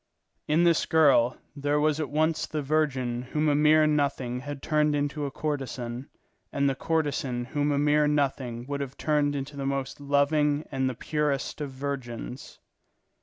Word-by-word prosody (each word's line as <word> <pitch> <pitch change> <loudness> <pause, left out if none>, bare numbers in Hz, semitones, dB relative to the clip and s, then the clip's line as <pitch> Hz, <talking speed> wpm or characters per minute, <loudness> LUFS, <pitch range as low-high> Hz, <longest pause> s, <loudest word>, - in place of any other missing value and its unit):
In 155 +3 +3
this 170 -2 +3
girl 140 -6 +4 0.2
there 145 +1 0
was 155 0 +2
at 155 - -2
once 155 +2 +1
the 150 -2 -3
virgin 135 -5 0
whom 150 +5 -1
a 150 - +4
mere 155 +1 +5
nothing 140 -5 0
had 145 +1 -7
turned 150 -1 +2
into 145 0 -1
a - - -6
courtesan, 135 -4 -4 0.4
and 140 0 +1
the 135 - +2
courtesan 140 -5 -1
whom 145 +2 -1
a 140 - +1
mere 150 +1 +3
nothing 135 -5 -1
would 140 +1 -3
have 135 -1 -6
turned 145 -2 +1
into 140 +1 -5
the 140 -1 -3
most 140 0 -3
loving 145 +1 +2
and 130 -1 0
the 130 - -5
purest 150 +2 -2
of 145 - -3
virgins. 130 -2 -6
145 Hz, 170 wpm, -27 LUFS, 135-150 Hz, 0.4 s, mere